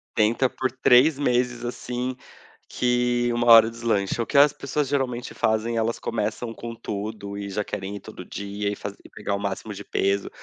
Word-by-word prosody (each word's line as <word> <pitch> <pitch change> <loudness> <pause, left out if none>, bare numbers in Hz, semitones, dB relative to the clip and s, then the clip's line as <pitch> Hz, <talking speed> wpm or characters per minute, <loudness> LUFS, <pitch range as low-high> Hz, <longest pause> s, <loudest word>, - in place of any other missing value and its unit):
Tenta 115 +4 +3
por 130 -2 -2
3 130 +3 +5
meses 125 -3 +1
assim, 125 +1 -3 0.5
que 120 0 +1
uma 120 0 0
hora 115 -1 +9
deslancha, 115 -2 -1
o - - -1
que 140 - 0
as 145 +1 +7
pessoas 145 0 -2
geralmente 130 -3 -2
fazem 110 +1 0
elas 115 +1 0
começam 115 +1 -3
com 115 +1 -7
tudo 105 -2 -5
e 100 -1 -5
já 105 +2 -2
querem 100 0 -5
ir 100 - -6
todo - - -10
dia 100 0 -4
e - - -3
faz 100 0 -6
e - - -14
pegar 105 -1 -3
o - - -3
máximo 100 -1 -4
de - - -8
peso. 100 +1 0
115 Hz, 190 wpm, -24 LUFS, 105-125 Hz, 0.5 s, hora